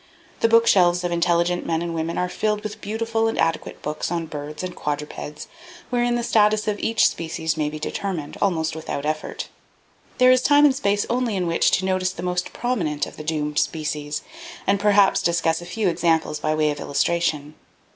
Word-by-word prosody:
The - - +4
bookshelves 185 -6 +4
of 175 - -1
intelligent 170 0 +1
men 165 0 -1
and 170 -1 -3
women 165 +1 -2
are 180 - 0
filled 210 +3 -1
with 215 -1 -6
beautiful 225 +1 -1
and 225 - -2
adequate 165 -1 -1
books 150 +1 -3
on 170 -1 -1
birds 150 +1 -7
and 180 -1 -5
quadrupeds, 150 0 -5 0.4
wherein 240 0 +1
the 240 - -1
status 215 -1 +3
of 205 -1 -1
each 225 0 +3
species 160 -1 -3
may 150 -2 -1
be 155 - -6
determined, 160 -1 -4
almost 165 -4 0
without 155 -2 -4
effort. 155 0 -3 0.7
There 255 0 +6
is 255 0 +4
time 290 +2 +5
and 285 - +5
space 205 -6 0
only 240 -3 0
in 185 -2 0
which 165 -1 +2
to 190 - -3
notice 185 -1 +1
the 170 - -7
most 180 0 -2
prominent 175 -12 -1
of - - -11
the - - -8
doomed 150 -1 -1
species, 150 -2 -2 0.4
and 200 0 +2
perhaps 200 -1 +4
discuss 165 -2 +1
a 175 - -9
few 210 +3 -1
examples 165 -3 +1
by 155 0 0
way 155 -1 +2
of 145 - -6
illustration. 150 0 0
175 Hz, 190 wpm, -23 LUFS, 155-210 Hz, 0.7 s, There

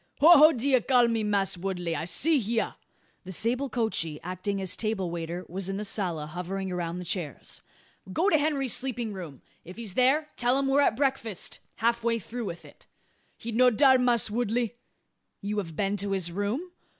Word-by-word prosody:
"Ho 315 - +7
ho! 305 +1 +8
d'ye 260 -1 +2
call 245 0 +3
me, 230 -2 0
Mass' 200 -2 +1
Woodley? 175 -3 -2
I'se 170 - 0
hya." 230 -3 0 0.5
The 185 - -8
sable 245 +8 -1
coachee, 215 -11 -1
acting 185 +3 -3
as 190 -1 0
table 210 -6 -2
waiter, 170 +1 -5
was 190 +2 -5
in 195 - -2
the 210 - -3
sala, 175 -7 -2
hovering 180 +4 -4
around 175 -1 -3
the 180 - -6
chairs. 165 - -4 0.5
"Go 335 - +1
to 315 - +5
Henry's 285 -4 +1
sleeping 245 -4 -2
room. 170 -8 -9 0.2
If 180 +4 -11
he's 225 -5 -3
there, 275 +7 +3
tell 245 +2 +2
him 275 - 0
we're 275 +1 +4
at 230 -5 +2
breakfast 265 -8 -1 0.2
half 235 +1 +1
through 230 0 -2
with 170 -3 -7
it." - - -18 0.5
"He 235 - -6
no 250 +3 +5
dar, 260 +2 +5
Mass' 240 -3 +2
Woodley." 235 0 -1 0.7
"You 205 +1 -2
have 165 -5 -6
been 200 +3 0
to 200 0 -1
his 180 -3 0
room?" 210 - -3
210 Hz, 185 wpm, -27 LUFS, 185-250 Hz, 0.7 s, ho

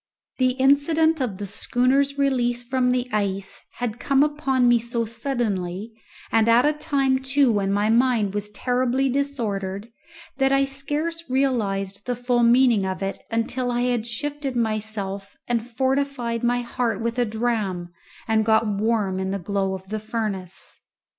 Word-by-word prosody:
The 255 -1 +3
incident 290 +4 +3
of 220 -7 -2
the 205 - -5
schooner's 260 +7 +1
release 245 -3 +1
from 250 0 +1
the 250 0 0
ice 195 -2 -2
had 240 -2 -4
come 275 0 +3
upon 275 -4 +1
me 240 -1 +5
so 235 0 -2
suddenly, 220 -5 -3 0.4
and 225 0 +3
at 235 +3 +5
a 300 - +3
time 275 -3 +1
too 270 -1 +3
when 200 -2 0
my 205 +2 +2
mind 230 -4 +2
was 205 0 -3
terribly 250 +4 0
disordered, 225 -7 -2 0.5
that 270 0 +2
I 275 0 +4
scarce 295 +5 -3
realized 205 -7 -1
the 245 - 0
full 245 0 +1
meaning 235 -3 +5
of 190 0 -3
it 195 - -3
until 240 +2 -1
I 240 0 0
had 245 -2 0
shifted 280 +2 -4
myself 215 -3 -2
and 240 0 -1
fortified 260 -2 -1
my 245 +1 +2
heart 235 -3 -2
with 235 +2 -2
a 245 - +3
dram 215 -6 -2 0.4
and 220 -1 +2
got 220 +1 +3
warm 205 -2 0
in 190 0 -2
the 195 - -1
glow 195 +1 -1
of 190 0 -11
the 215 0 -2
furnace. 210 -4 -4
240 Hz, 160 wpm, -23 LUFS, 210-265 Hz, 0.5 s, me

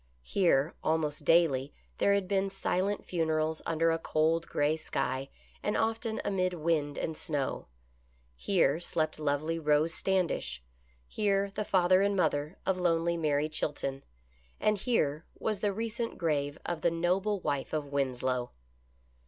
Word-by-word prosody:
Here 160 - +2
almost 155 -2 0
daily 145 -5 +3 0.2
there 200 - +4
had 200 -2 -1
been 195 0 +1
silent 195 +1 -1
funerals 160 -2 0
under 165 0 +2
a 165 - 0
cold, 165 +1 +1
gray 145 +2 +1
sky 135 -3 -2 0.3
and 210 - 0
often 225 0 -1
amid 185 -2 +1
wind 155 -3 0
and 160 - -2
snow. 145 -4 -2 0.7
Here 160 - +2
slept 155 -3 -1
lovely 155 +2 0
Rose 150 +1 +2
Standish; 170 - -1 0.4
here 200 - +1
the 210 - -2
father 185 0 +4
and 200 0 +2
mother 150 -2 0
of 190 -1 +1
lonely 170 -1 +2
Mary 150 -2 +1
Chilton, 145 -3 -3 0.6
and 210 -1 +2
here 160 - 0
was 215 -3 -1
the 205 0 +1
recent 230 +3 -3
grave 145 -3 0
of 170 -2 -3
the 170 - +3
noble 185 +5 0
wife 140 -5 -2
of 155 -2 -1
Winslow. 130 -3 -1
165 Hz, 140 wpm, -30 LUFS, 145-190 Hz, 0.7 s, there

